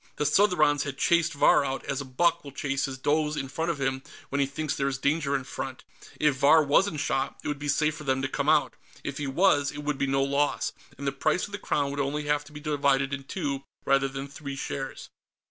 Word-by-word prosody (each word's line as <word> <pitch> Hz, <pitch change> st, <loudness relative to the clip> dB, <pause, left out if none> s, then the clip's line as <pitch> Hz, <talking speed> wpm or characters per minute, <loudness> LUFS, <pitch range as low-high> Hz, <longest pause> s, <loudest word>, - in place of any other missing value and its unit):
The -, -, -1 dB
Southrons 150 Hz, -3 st, +4 dB
had 140 Hz, -3 st, -4 dB
chased 170 Hz, +1 st, +2 dB
Vahr 145 Hz, 0 st, +5 dB
out, 135 Hz, -1 st, -3 dB
as 140 Hz, 0 st, -2 dB
a -, -, -6 dB
buck 170 Hz, +6 st, +1 dB
will 140 Hz, -, -9 dB
chase 140 Hz, 0 st, -1 dB
his 135 Hz, -1 st, -5 dB
does 150 Hz, +2 st, +1 dB
in 135 Hz, -, -2 dB
front 160 Hz, +5 st, -2 dB
of 160 Hz, -4 st, -2 dB
him 135 Hz, -1 st, -1 dB, 0.3 s
when 140 Hz, -, -1 dB
he 140 Hz, -, +2 dB
thinks 145 Hz, +2 st, -3 dB
there 140 Hz, -, 0 dB
is 135 Hz, -1 st, -1 dB
danger 140 Hz, +1 st, +1 dB
in 135 Hz, -, -1 dB
front. 130 Hz, 0 st, -6 dB, 0.4 s
If 150 Hz, -3 st, +3 dB
Vahr 150 Hz, +4 st, +6 dB
wasn't 150 Hz, +3 st, +2 dB
shot, 135 Hz, -1 st, -1 dB
it -, -, -4 dB
would 145 Hz, -1 st, -2 dB
be 145 Hz, -, -4 dB
safe 150 Hz, +2 st, +1 dB
for -, -, -8 dB
them 135 Hz, -1 st, 0 dB
to -, -, +1 dB
come 140 Hz, +2 st, -1 dB
out. 155 Hz, -1 st, +3 dB, 0.3 s
If 140 Hz, 0 st, -4 dB
he 145 Hz, -, -2 dB
was, 145 Hz, -1 st, +3 dB
it 145 Hz, 0 st, -7 dB
would 145 Hz, -1 st, -2 dB
be 140 Hz, -, +1 dB
no 135 Hz, 0 st, +2 dB
loss, 140 Hz, +1 st, 0 dB, 0.3 s
and 140 Hz, -, -7 dB
the 140 Hz, -, +1 dB
price 155 Hz, +5 st, 0 dB
of 205 Hz, -, -12 dB
the 205 Hz, -, -5 dB
Crown 140 Hz, -6 st, 0 dB
would 140 Hz, -, -4 dB
only 145 Hz, +2 st, -1 dB
have 145 Hz, 0 st, 0 dB
to 150 Hz, -, -14 dB
be 150 Hz, -, -9 dB
divided 140 Hz, -2 st, +1 dB
in 135 Hz, -1 st, -4 dB
two, 140 Hz, -5 st, -3 dB, 0.2 s
rather 135 Hz, 0 st, +3 dB
than 135 Hz, +1 st, -6 dB
three, 140 Hz, 0 st, -7 dB
shares. 135 Hz, 0 st, -5 dB
140 Hz, 250 wpm, -27 LUFS, 135-150 Hz, 0.4 s, Vahr